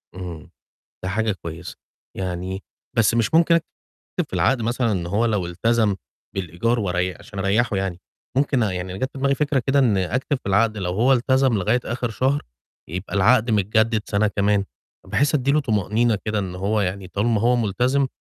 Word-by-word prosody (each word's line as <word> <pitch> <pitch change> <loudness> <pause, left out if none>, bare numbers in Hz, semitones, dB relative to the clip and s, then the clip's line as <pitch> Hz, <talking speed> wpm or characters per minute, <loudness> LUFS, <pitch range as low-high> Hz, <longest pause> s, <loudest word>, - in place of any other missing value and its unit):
إمم. 90 -4 -7 0.5
ده 95 - -2
حاجة 110 +3 0
كويسة، 85 -3 -8 0.4
يعني 95 +1 -4 0.3
بس 115 0 +4
مش 115 +3 +1
ممكن 170 +1 +5
أكتب 165 +1 -4
في - - -30
العَقْد 130 -3 +2
مثلًا 120 0 0
إن 90 -4 -2
هو 100 +6 +1
لو 105 -6 0
إلتزم 105 +3 +1 0.4
بالإيجار 95 +6 -1
وري 90 -2 -1
عشان 100 - -11
أريّحه 100 +3 +1
يعني، 95 -2 -2 0.4
ممكن 135 -2 +2
يعني 95 -2 -3
جات 130 +4 -2
في - - -8
دماغي 140 +1 +2
فكرة 140 -1 +1
كده 140 +1 +3
إن 120 -7 +4
أكتب 125 - -1
في 125 - -15
العَقْد 105 +2 +2
لو 90 -2 -2
هو 120 +8 +3
إلتزم 130 0 +3
لغاية 110 +5 +1
آخِر 120 0 -2
شهر 135 +6 0 0.5
يبقى 90 +6 -5
العَقْد 115 +4 +4
متجدِّد 110 +2 +2
سَنة 105 +1 +1
كمان، 100 -1 +1 0.4
بحيث 145 +2 +1
أدّي 140 -2 +2
له 150 - +3
طُمأنينة 110 -1 +1
كده 105 -1 -1
إن 95 -3 -3
هو 100 +4 0
يعني 95 0 -2
طالما 105 +3 0
هو 120 +2 +3
ملتزم 125 +5 +1
110 Hz, 180 wpm, -22 LUFS, 95-125 Hz, 0.5 s, ممكن